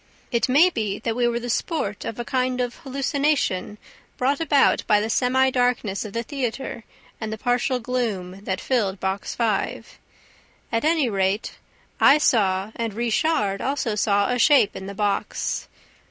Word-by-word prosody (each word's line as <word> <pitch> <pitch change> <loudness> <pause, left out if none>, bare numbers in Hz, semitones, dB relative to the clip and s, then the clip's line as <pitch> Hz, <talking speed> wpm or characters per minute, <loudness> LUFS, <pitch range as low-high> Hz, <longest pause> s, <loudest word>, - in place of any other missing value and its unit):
It 235 +1 +1
may 315 +8 +5
be 210 - -2
that 225 +1 -3
we 240 0 +2
were 235 0 0
the 240 - -6
sport 225 - -2
of 225 - -5
a 240 - -3
kind 255 0 0
of 245 -1 -2
hallucination 275 - -1 0.4
brought 275 +3 +1
about 290 -4 +3
by 210 -1 +5
the 220 +2 -2
semi 260 +2 +2
darkness 245 -6 0
of 210 -2 -8
the 230 - -2
theater 250 -2 -4 0.4
and 220 -1 -3
the 220 - -4
partial 245 +2 0
gloom 210 -7 -3
that 190 -2 -2
filled 205 -7 0
Box 190 +1 -3
Five. 225 -4 -2 0.7
At 230 - 0
any 310 -3 +2
rate, 195 0 -1 0.4
I 280 - +7
saw 200 -8 +2
and 230 -3 -3
Richard 225 -3 0
also 265 -4 -1
saw 205 -1 +2
a 250 - 0
shape 270 -5 +5
in 190 - -7
the 200 - -7
box. 205 0 -2
235 Hz, 165 wpm, -23 LUFS, 205-260 Hz, 0.7 s, I